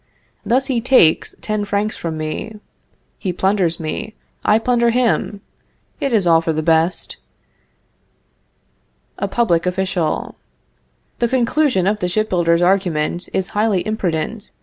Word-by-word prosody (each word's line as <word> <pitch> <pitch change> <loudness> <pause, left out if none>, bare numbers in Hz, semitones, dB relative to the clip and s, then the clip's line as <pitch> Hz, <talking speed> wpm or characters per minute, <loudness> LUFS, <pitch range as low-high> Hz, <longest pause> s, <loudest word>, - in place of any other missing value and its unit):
Thus 260 +3 +1
he 255 -4 -1
takes 225 -10 +3
ten 215 -1 -2
francs 205 +1 -1
from 165 -2 -4
me. 155 +8 -5 0.6
He 185 - -2
plunders 185 -2 0
me; 215 +7 -5 0.3
I 215 0 +4
plunder 235 0 +2
him. 235 -4 0 0.6
It 280 -3 -1
is 215 -5 +2
all 165 -1 +5
for 165 - -1
the 155 0 -2
best. 165 +2 +1 2.0
"A - - -1
Public 180 -8 +1
Official. 180 -3 -1 0.9
The 235 - +2
conclusion 255 -3 +1
of 210 +2 +1
the 180 - -1
ship 215 +4 -1
builder's 170 -1 +2
argument 175 -3 0
is 190 -1 -2
highly 205 -3 0
imprudent. 205 0 -3
195 Hz, 130 wpm, -19 LUFS, 170-225 Hz, 2.0 s, all